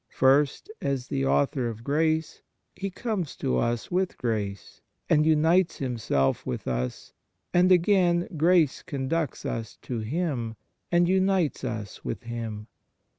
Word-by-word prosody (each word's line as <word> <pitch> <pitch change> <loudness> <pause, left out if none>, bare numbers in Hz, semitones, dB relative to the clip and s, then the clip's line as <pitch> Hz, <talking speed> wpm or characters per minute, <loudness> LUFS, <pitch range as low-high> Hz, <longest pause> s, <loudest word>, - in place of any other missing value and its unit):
First, 140 - +2
as 135 -2 -2
the 70 0 0
Author 70 - +1
of 115 0 -8
grace, 155 +3 0 0.3
He 195 +1 -3
comes 195 - -3
to 65 0 0
us 120 - -1
with 185 +1 0
grace, 105 -5 -3 0.3
and 155 0 +4
unites 160 +3 +3
Himself 115 - 0
with 60 - -4
us, 60 0 -3 0.4
and 180 +1 +5
again 175 -1 +4
grace 165 -2 +3
conducts 145 +2 -2
us 115 -2 -4
to 120 -3 -3
Him 120 -2 -2 0.4
and 175 0 +4
unites 190 -5 +2
us 110 -5 -5
with - - -4
Him. 115 -2 -5
140 Hz, 130 wpm, -27 LUFS, 115-175 Hz, 0.4 s, and